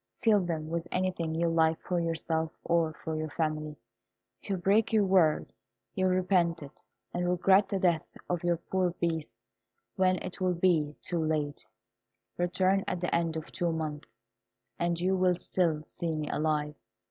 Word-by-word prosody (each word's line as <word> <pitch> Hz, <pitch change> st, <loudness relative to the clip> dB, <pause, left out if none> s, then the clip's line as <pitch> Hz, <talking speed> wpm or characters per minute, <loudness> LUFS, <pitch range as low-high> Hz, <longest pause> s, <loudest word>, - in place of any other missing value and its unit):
Fill 220 Hz, -3 st, +5 dB
them 165 Hz, -4 st, -3 dB
with 170 Hz, +1 st, -3 dB
anything 180 Hz, -3 st, -1 dB
you 170 Hz, +1 st, +1 dB
like 160 Hz, -1 st, +2 dB
for 180 Hz, -1 st, -1 dB
yourself 160 Hz, -1 st, -1 dB
or 165 Hz, -1 st, +2 dB
for 160 Hz, -, -2 dB
your 155 Hz, 0 st, -3 dB
family. 155 Hz, -1 st, -2 dB, 0.7 s
If -, -, -13 dB
you 195 Hz, -, 0 dB
break 200 Hz, +5 st, +2 dB
your 215 Hz, -2 st, +4 dB
word 180 Hz, -5 st, +3 dB, 0.4 s
you 185 Hz, -, 0 dB
will 185 Hz, -, +2 dB
repent 175 Hz, -3 st, +2 dB
it, 140 Hz, -, -13 dB, 0.3 s
and 175 Hz, 0 st, 0 dB
regret 190 Hz, +3 st, +4 dB
the 200 Hz, -, 0 dB
death 175 Hz, -4 st, +1 dB, 0.2 s
of 175 Hz, -1 st, -2 dB
your 175 Hz, -1 st, +2 dB
poor 180 Hz, +1 st, -1 dB
Beast 160 Hz, -7 st, -2 dB, 0.6 s
when 185 Hz, -1 st, +4 dB
it 180 Hz, -, -6 dB
will 180 Hz, -1 st, +2 dB
be 165 Hz, -4 st, +2 dB
too 170 Hz, -2 st, -1 dB
late. 150 Hz, -2 st, -1 dB, 0.7 s
Return 185 Hz, +2 st, +2 dB
at 180 Hz, -, -1 dB
the 175 Hz, -, -2 dB
end 165 Hz, -1 st, +1 dB
of 160 Hz, -, -7 dB
two 175 Hz, -1 st, -1 dB
months, 155 Hz, -2 st, -4 dB, 0.7 s
and 170 Hz, 0 st, 0 dB
you 185 Hz, +2 st, +2 dB
will 185 Hz, -1 st, +3 dB
still 170 Hz, -3 st, 0 dB
see 165 Hz, 0 st, -3 dB
me 155 Hz, -1 st, -3 dB
alive. 150 Hz, -1 st, 0 dB
170 Hz, 170 wpm, -30 LUFS, 160-185 Hz, 0.7 s, Fill